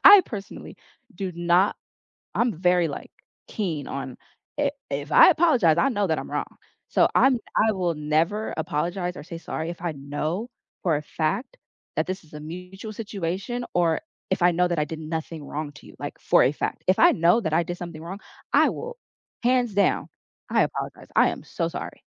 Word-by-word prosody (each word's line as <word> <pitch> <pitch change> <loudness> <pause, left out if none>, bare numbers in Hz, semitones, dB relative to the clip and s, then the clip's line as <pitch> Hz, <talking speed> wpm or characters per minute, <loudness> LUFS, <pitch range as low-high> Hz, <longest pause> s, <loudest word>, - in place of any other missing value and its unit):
I 405 -1 +11
personally 200 -3 -8 0.4
do 190 -2 -4
not 175 +3 +3 0.6
I'm 235 0 +2
very, 180 0 +3
like, 145 - -7 0.4
keen 165 -9 -3
on 135 -2 -5 0.4
i 290 -1 +2 0.2
if 145 +2 -3
I 370 - +9
apologize, 260 - +4
I 270 - +4
know 205 -6 +1
that 160 -2 0
I'm - - -6
wrong. - - -3 0.3
So - - +4
I'm 265 -2 +5 0.2
I 220 0 +4
will 180 -4 0
never 160 +8 0
apologize 175 +4 -2
or - - -7
say 170 -1 -7
sorry 165 0 -4
if 170 - -8
I 175 -2 -1
know 150 - -3 0.3
for 165 -4 +2
a 145 - -3
fact 160 - -2 0.4
that - - +1
this 185 +1 -4
is 155 - -21
a 150 - -7
mutual 180 +7 -8
situation 205 +2 -3
or 170 -2 +2 0.3
if - - 0
I 175 0 +6
know 180 +1 +2
that 175 - -1
I 150 - +3
did 160 +1 -7
nothing 160 0 -4
wrong 145 +1 -4
to 150 - -15
you, - - -14
like, - - -5
for - - +5
a 135 - +3
fact. - - -3
If 185 - +3
I - - +8
know 175 +7 +4
that 160 -8 -2
I 165 +2 +3
did 175 +1 -4
something 170 -3 -7
wrong, 185 +5 -7 0.3
I - - +6
will, 485 +1 -5 0.5
hands 245 -3 +2
down, 200 - +2 0.4
"I - - +4
apologize. - - -4
I - - +6
am - - -6
so - - -2
sorry." - - -7
175 Hz, 195 wpm, -25 LUFS, 160-205 Hz, 0.6 s, I